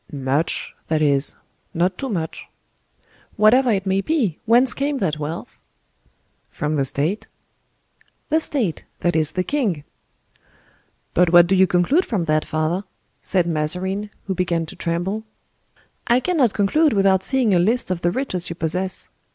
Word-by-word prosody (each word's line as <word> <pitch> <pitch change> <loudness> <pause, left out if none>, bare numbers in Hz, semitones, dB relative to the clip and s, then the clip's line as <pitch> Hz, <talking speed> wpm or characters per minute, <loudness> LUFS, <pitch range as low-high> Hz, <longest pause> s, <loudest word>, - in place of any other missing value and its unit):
"Hum! 140 -2 -7
much—that 155 +3 -1
is, 140 -2 +1 0.4
not 180 +3 +1
too 270 +7 -5
much." 165 -7 -4 0.9
"Whatever 240 +5 +4
it 200 -3 0
may 190 0 +1
be, 230 - -1
whence 245 +3 +5
came 280 +1 -1
that 160 - -1
wealth?" 155 +3 -6 0.9
"From 150 +1 -2
the 140 -2 +1
state." 155 +10 -1 1.0
"The 315 - +3
state; 245 - -1 0.2
that 175 -1 +1
is 155 -2 +1
the 185 - 0
king." 210 - -1 1.3
"But 175 -1 +3
what 175 -1 +8
do 190 +2 +1
you 190 0 +5
conclude 180 - +2
from 195 -7 -1
that, 155 -1 +1
father?" 155 +5 -1 0.4
said 185 -3 0
Mazarin, 180 +6 -1 0.2
who 195 - -2
began 175 -2 -1
to - - -10
tremble. 180 +5 -2 0.8
"I 240 +1 +4
cannot 275 - +1
conclude 290 +10 +3
without 195 -2 +3
seeing 255 -4 +1
a 180 - +4
list 215 +3 +1
of 175 -2 -2
the 175 - +2
riches 185 -5 -2
you 170 - -5
possess. 180 +3 -2
185 Hz, 150 wpm, -21 LUFS, 165-220 Hz, 1.3 s, what